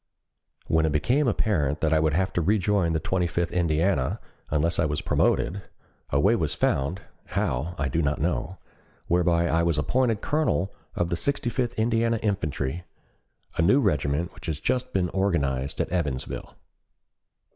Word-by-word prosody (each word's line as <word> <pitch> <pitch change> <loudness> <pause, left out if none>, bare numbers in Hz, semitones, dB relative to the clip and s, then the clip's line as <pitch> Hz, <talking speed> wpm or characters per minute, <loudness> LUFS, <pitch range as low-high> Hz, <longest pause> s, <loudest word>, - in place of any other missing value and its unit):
When 80 0 +2
it - - 0
became 125 - +2
apparent 80 - +1
that 80 -1 +2
I 80 - +4
would 80 -1 +2
have 95 +2 0
to 85 - +1
rejoin 100 -2 +2
the 80 - +1
Twenty 90 +2 0
fifth 85 0 -1
Indiana 85 -4 +1 0.3
unless 85 +3 +1
I 85 - +3
was 75 0 -1
promoted, 95 +4 +1 0.5
a 70 - +1
way 100 +10 +4
was 80 -8 -1
found 70 +9 0 0.3
(how 85 -4 -1
I 70 - 0
do 80 +5 0
not 75 -1 0
know) 90 +6 -1 0.5
whereby 85 -1 +2
I 80 +1 +2
was 85 -2 +1
appointed 115 - +1
colonel 145 - 0 0.2
of 85 -1 0
the 85 - 0
Sixty 125 +5 -1
fifth 120 0 -1
Indiana 115 +1 +1
Infantry, 80 -6 -2 0.7
a - - +3
new 100 +12 +5
regiment 75 - 0
which - - -11
had 80 - -1
just 130 0 0
been 90 -2 0
organized 70 -9 -1
at - - 0
Evansville. 75 -8 -3
85 Hz, 165 wpm, -26 LUFS, 75-100 Hz, 0.7 s, new